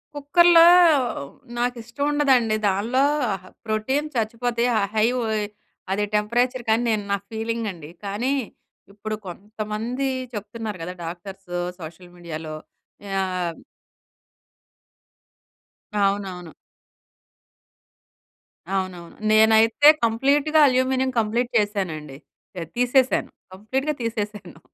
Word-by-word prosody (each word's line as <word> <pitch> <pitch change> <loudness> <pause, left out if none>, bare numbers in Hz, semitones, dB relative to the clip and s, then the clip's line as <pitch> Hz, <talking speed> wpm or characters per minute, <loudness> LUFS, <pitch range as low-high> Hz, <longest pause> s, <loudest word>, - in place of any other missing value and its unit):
కుక్కర్‌లో 335 +4 +5 0.6
హ్మ్, 140 0 -7 0.2
నాకిష్టముండదండి. 245 0 +1
దానిలో 225 +8 +1 0.3
అహ, 190 -2 -7 0.2
ప్రోటీన్ 230 +7 -1
చచ్చిపోతాయి. 235 +1 0
ఆ - - +1
హై 215 +1 +4
వోయి 220 -3 -1 0.5
అదే 205 +2 0
టెంపరేచర్‌కనీ 235 +1 +1
నేను 215 -2 0
నా 200 - +2
ఫీలింగండి. 220 -8 -4 0.2
కానీ, 215 +7 -1 0.6
ఇప్పుడు 215 +1 -5
కొంతమంది 215 +7 -4 0.3
చెప్తున్నారు 210 0 -6
కదా! 180 +2 -5
డాక్టర్స్ 180 +2 -9 0.3
సోషల్ 170 +3 -10
మీడియాలో 160 -2 -7 0.6
యాహ్ 185 -3 -2 2.4
అవునవును. 195 -4 -1 2.2
అవునవును. 185 -3 -4 0.2
నేనైతే 220 +5 +5 0.2
కంప్లీటుగా 280 +7 +2
అల్యూమినియం 260 0 +1
కంప్లీట్ 230 +3 0
చేశానండి. 180 -9 -2 0.4
యాహ్, 165 -2 -5
తీసేసాను. 250 +1 +2 0.2
కంప్లీట్‌గా 260 +10 -2
తీసేసాను. 210 -6 -5
220 Hz, 85 wpm, -23 LUFS, 195-245 Hz, 2.4 s, కుక్కర్‌లో